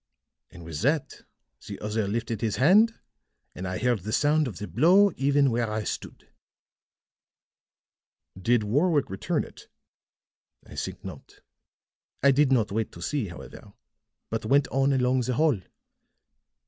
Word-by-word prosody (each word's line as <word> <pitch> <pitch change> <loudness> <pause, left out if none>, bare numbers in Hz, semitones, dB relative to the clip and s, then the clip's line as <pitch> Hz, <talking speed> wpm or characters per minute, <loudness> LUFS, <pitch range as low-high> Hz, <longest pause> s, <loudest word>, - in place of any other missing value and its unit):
"And 85 -2 -13
with 80 -3 -6
that 145 +5 -1 0.5
the - - -7
other 105 0 -2
lifted 115 +1 -3
his 110 -3 -1
hand, 205 - +5 0.6
and 95 - -6
I 90 0 -3
heard 125 0 +1
the 105 +4 -6
sound 150 +4 +2
of 110 - -7
the 105 - -6
blow 175 - +4
even 140 0 +2
where 115 -1 0
I 110 0 -2
stood." - - -6 2.1
"Did 115 +4 +1
Warwick 145 - +1
return 95 - -1
it?" - - -14 1.0
"I - - -13
think - - -6
not. - - -11 0.8
I 140 - +6
did 140 0 +3
not 115 -6 +2
wait 110 +1 -2
to 85 - -11
see, 140 -4 -2
however, 85 - -11 0.6
but - - -2
went 140 0 +3
on 135 +1 +1
along 130 -1 +2
the 125 +1 -2
hall. 150 -6 +2
125 Hz, 145 wpm, -26 LUFS, 105-145 Hz, 2.1 s, I